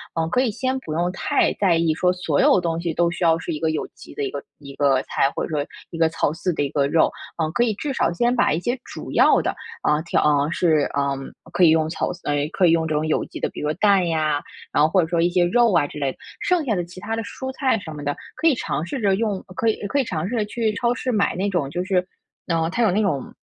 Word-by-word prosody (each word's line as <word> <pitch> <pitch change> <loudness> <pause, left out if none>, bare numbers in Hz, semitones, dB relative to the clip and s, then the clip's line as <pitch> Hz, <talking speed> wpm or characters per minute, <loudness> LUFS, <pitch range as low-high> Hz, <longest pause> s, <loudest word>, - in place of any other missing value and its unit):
呃， 165 -1 0
可 250 - +2
以 250 -4 +1
先 260 +4 -1
不 155 -11 -6
用 175 +3 0
太 190 - +1
在 190 -4 +2
意 165 -1 +2
说 180 +3 +2
所 175 -5 -1
有 185 - +5
东 165 -1 -1
西 170 -1 -2
都 170 +2 +2
需 175 +1 -4
要 165 -1 +4
是 165 - -5
一 155 - -3
个 160 0 +1
有 155 - -2
机 - - -14
的 430 - -3
一 410 - -1
个 - - -5 0.2
一 140 -2 -10
个 135 -2 +3
菜， 135 - +1
或 - - -2
者 - - -10
说 150 -3 -1 0.2
一 165 - -7
个 165 -1 +4
草 160 - 0
饲 170 +3 -2
的 - - 0
一 140 - -1
个 140 0 +1
肉， 160 +3 +3 0.3
啊， 160 -2 0
可 240 - +2
以 230 -3 +1
至 275 +7 -4
少 215 - +1
先 240 +7 +1
把 245 - +3
一 160 - 0
些 240 +7 -2
主 - - -8
要 - - +5
的， - - -2 0.3
啊， 150 +1 +2
调 170 - +1
啊， 145 -1 +2
是 160 -4 +2
嗯， 140 -1 -2 0.2
可 185 - +2
以 170 - +8
用 160 0 +3
草 160 - -2
饲 175 - -9
呃， 145 - 0 0.2
可 190 - +3
以 - - +5
用 165 -1 +2
这 155 - -2
种 150 +1 0
有 155 - 0
机 - - -9
的， - - -1
比 - - -8
如 150 +1 0
蛋 195 0 +3
呀， 155 -3 0 0.3
然 145 - +3
后 155 - +4
或 185 +3 +3
者 160 - -1
说 170 0 +1
一 170 - +3
些 175 0 +2
肉 235 +3 +3
啊， 145 - +3
之 150 - -10
类 140 -2 0
的， - - -16 0.2
剩 360 -3 +2
下 225 -5 +1
的 175 - -1
其 180 +2 -12
他 225 - -3
的 225 - -3
蔬 260 +5 -6
菜 260 -3 +1
什 165 -5 -8
么 145 -1 -7
的， 145 0 -1 0.2
可 325 - +1
以 315 - +6
尝 155 - -3
试 265 +7 -4
着 195 -2 +3
用 205 -2 -1
可 230 - 0
以 220 - +3
可 280 - 0
以 - - +3
尝 170 -7 -3
试 245 - -2
着 215 -2 +1
去 220 0 -1
超 235 +3 +1
市 255 +1 -2
买 210 -4 +1
那 195 +3 0
种 175 -8 -1
就 175 +3 -2
是 185 -2 +1 0.4
嗯， 165 -1 +1
它 240 - +1
有 215 - +4
那 205 +4 +2
种 145 -11 -1
175 Hz, 315 characters per minute, -22 LUFS, 155-210 Hz, 0.4 s, 以